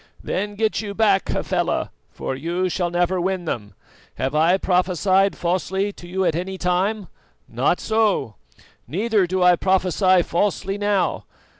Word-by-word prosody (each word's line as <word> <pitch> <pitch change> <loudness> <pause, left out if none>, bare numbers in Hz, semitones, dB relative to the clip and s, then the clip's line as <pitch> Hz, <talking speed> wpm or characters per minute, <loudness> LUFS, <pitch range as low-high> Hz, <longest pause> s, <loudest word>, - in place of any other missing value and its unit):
"Then 205 +2 -3
get 220 +1 0
you 205 -2 -6
back, 200 -3 +2
Hafela, - - -1 0.2
for 130 - -5
you 170 +6 -2
shall 175 0 -1
never 175 +1 0
win 185 0 -2
them.. 105 -9 -5 0.4
Have 130 +2 -2
I 165 +5 +4
prophesied 185 +1 +2
falsely 190 +3 -1
to 175 - -12
you 190 +2 -1
at 165 -3 +1
any 185 +3 -4
time? 185 +3 0 0.4
Not 130 +9 0
so 215 - +1 0.5
neither 205 +2 +1
do 185 +1 0
I 180 0 +6
prophesy 185 0 +2
falsely 195 +3 -1
now. 205 -2 0
185 Hz, 145 wpm, -22 LUFS, 175-200 Hz, 0.5 s, I